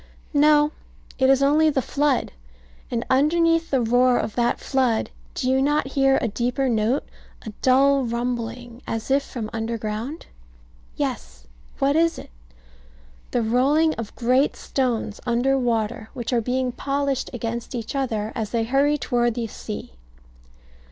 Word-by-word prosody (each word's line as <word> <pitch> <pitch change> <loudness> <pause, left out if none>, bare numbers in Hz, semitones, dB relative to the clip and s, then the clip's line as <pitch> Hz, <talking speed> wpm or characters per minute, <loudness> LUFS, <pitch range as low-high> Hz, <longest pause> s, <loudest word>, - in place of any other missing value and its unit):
No. 295 0 +5 0.5
It 265 0 +4
is 270 0 +4
only 305 +3 +4
the 280 - +1
flood. 285 0 0 0.6
And 235 -1 -2
underneath 330 +4 +3
the 265 -2 +2
roar 245 +2 +3
of 215 - -2
that 240 0 +1
flood, 255 -4 0 0.2
do - - -2
you 265 +1 +3
not 290 0 +1
hear 270 -1 +3
a - - -1
deeper 245 +5 -1
note 230 +3 +1 0.4
a 220 - -5
dull 275 +1 +4
rumbling, 240 0 -4
as 225 +3 -3
if 275 +1 +4
from 240 -5 -6
underground? 225 +5 -4 0.7
Yes. 60 +1 -4 0.3
What 275 +1 +2
is 330 +1 +2
it? - - -10 1.0
The 240 - 0
rolling 280 +8 +3
of 230 -2 -7
great 255 +4 +2
stones 240 -5 -2
under 245 +3 +2
water, 225 -4 -1
which 245 0 -3
are 235 - +2
being 255 +2 -1
polished 275 +1 -2
against 235 +1 -4
each 230 +2 -5
other, 225 -6 -1
as 220 -3 -3
they 230 -1 0
hurry 275 +5 +2
toward 240 -4 0
the 240 -2 -2
sea. 215 - -7
250 Hz, 145 wpm, -23 LUFS, 230-275 Hz, 1.0 s, No